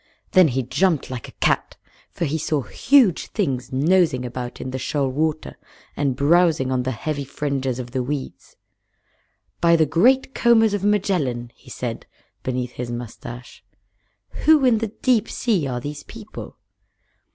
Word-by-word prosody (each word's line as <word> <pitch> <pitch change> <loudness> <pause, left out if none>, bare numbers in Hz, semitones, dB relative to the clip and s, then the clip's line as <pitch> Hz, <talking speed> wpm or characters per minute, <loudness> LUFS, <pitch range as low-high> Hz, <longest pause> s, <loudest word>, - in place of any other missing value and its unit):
Then 185 -2 +6
he 130 -1 -1
jumped 140 +4 0
like 125 -3 -6
a - - -11
cat, - - 0 0.3
for 170 - -3
he 155 +2 -1
saw 150 -2 -1
huge 235 - +3
things 135 - -2
nosing 150 -1 +2
about 125 0 -6
in 130 - -5
the 130 - -4
shoal 140 +2 -1
water 155 +3 -2 0.4
and 140 -3 0
browsing 155 -1 +3
on 130 -1 +1
the 125 - -2
heavy 140 +4 -3
fringes 135 -2 -2
of 125 -1 -6
the 130 0 -1
weeds. 130 -8 -5 1.0
"By 170 0 +5
the 160 -1 +4
Great 250 - +3
Combers 225 -3 +4
of 205 -2 -2
Magellan!" 175 - 0
he - - -19
said, - - -5 0.3
beneath 125 -1 -3
his 125 -1 -6
mustache. 120 -1 -8 0.8
"Who 305 -3 +6
in 235 -4 +4
the 225 - -1
Deep 230 +2 +1
Sea 200 - 0
are 125 -2 -3
these 145 +3 -6
people?" 220 -2 -10
145 Hz, 155 wpm, -22 LUFS, 130-185 Hz, 1.0 s, Then